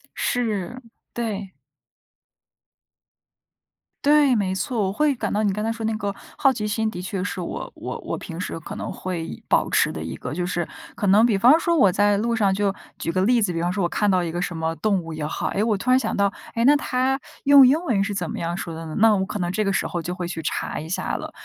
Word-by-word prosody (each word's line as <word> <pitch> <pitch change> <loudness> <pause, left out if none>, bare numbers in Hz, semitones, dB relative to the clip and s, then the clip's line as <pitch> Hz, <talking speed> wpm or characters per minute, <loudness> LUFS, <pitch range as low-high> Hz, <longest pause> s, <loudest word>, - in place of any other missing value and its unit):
是， 230 -1 -2 0.3
对。 210 -5 -4 2.5
对， 290 -3 +5
没 190 -3 0
错。 230 +4 -1
我 - - -1
会 295 +8 +2
感 225 -5 -3
到 210 - +1
你 200 -2 +1
刚 210 +2 -3
才 225 - 0
说 225 -1 -4
那 220 - 0
个 205 -2 -3 0.2
好 270 - +4
奇 220 -4 -3
心， 220 +1 0
的 180 - -7
确 185 0 -3
是 - - -4
我 - - -5
我 - - -6
我 - - -4
平 165 -1 -8
时 165 - -4
可 - - -8
能 - - -5
会 175 -3 -5
保 - - +2
持 - - +3
的 80 - -6
一 80 +1 -5
个 - - -6
就 175 +3 -2
是 175 -1 -2 0.3
可 - - -3
能 200 +3 +6
比 225 -5 +3
方 260 +11 +6
说 340 0 +1
我 200 -10 +5
在 205 +2 +3
路 230 +3 0
上 205 -3 +2
就 195 0 +1 0.2
举 165 - -2
个 185 - 0
例 235 +1 +3
子， 180 -3 0
比 165 - -2
方 175 - 0
说 195 +1 -1
我 175 - +3
看 210 +3 +1
到 185 -2 +3
一 165 - -3
个 175 +1 -3
什 175 -2 -3
么 160 0 -1
动 205 -3 +1
物 165 0 -7
也 155 -1 -5
好， - - -2
诶， 200 - 0
我 220 -2 +1
突 245 +6 0
然 255 - +6
想 225 - -2
到， 200 -1 +2 0.2
诶， 230 - +1
那 290 +3 +7
它 265 -1 0 0.2
用 280 -2 +8
英 275 +4 +4
文 205 -9 +2
是 200 0 -3
怎 175 -4 -3
么 - - -4
样 170 +1 -2
说 170 -3 -5
的 165 0 -7
呢？ 155 - -6
那 220 0 +5
我 190 - 0
可 200 - -4
能 175 -2 -1
这 215 +3 0
个 195 - +1
时 195 - 0
候 175 - -3
就 175 +2 -4
会 180 -2 -4
去 165 -2 -5
查 - - -3
一 155 - -7
下 185 - -2
了。 - - -5
200 Hz, 275 characters per minute, -23 LUFS, 180-230 Hz, 2.5 s, 用